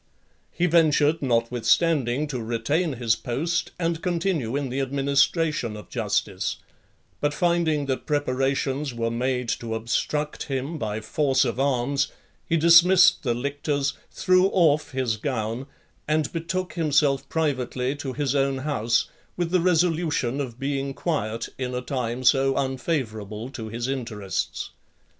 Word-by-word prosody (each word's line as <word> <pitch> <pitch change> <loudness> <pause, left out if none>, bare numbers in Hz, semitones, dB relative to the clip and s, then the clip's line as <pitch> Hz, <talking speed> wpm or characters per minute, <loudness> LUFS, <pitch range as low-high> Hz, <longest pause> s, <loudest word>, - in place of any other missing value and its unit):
He 175 - 0
ventured, 160 -2 +3
notwithstanding, 125 +3 +2
to 125 -4 -3
retain 120 +9 0
his 115 -3 +1
post 165 +7 -2
and 165 -1 -1
continue 170 -9 -1
in 140 -2 -1
the 130 +2 -2
administration 140 -2 +1
of 105 - -11
justice; - - -1 0.6
but 145 0 0
finding 165 -4 +1
that 135 -1 -3
preparations 135 -1 0
were 115 0 -1
made 125 +1 -1
to 115 -1 -2
obstruct 150 +6 -2
him 140 +3 -3
by 110 -2 -3
force 135 +3 +1
of 120 0 -2
arms, 135 0 +1 0.4
he 165 - +3
dismissed 170 +3 +6
the 120 -4 0
lictors, 140 +2 -1 0.2
threw 185 +1 +3
off 160 -6 +3
his 130 -5 -1
gown, 115 0 -3 0.4
and 155 -1 0
betook 180 +2 -3
himself 145 -4 +1
privately 130 -4 -1
to 135 -2 -5
his 140 -1 -1
own 135 -1 +1
house, 130 -5 0 0.3
with 175 -1 -1
the 180 -1 +3
resolution 165 -6 +1
of 120 -4 -6
being 135 0 -2
quiet, 115 -9 -2
in 125 -1 -3
a 125 - -2
time 125 -1 -3
so 135 +1 +4
unfavourable 125 -5 -3
to 115 -5 -6
his 120 +2 -3
interests. 115 -7 -3
135 Hz, 135 wpm, -25 LUFS, 125-155 Hz, 0.6 s, dismissed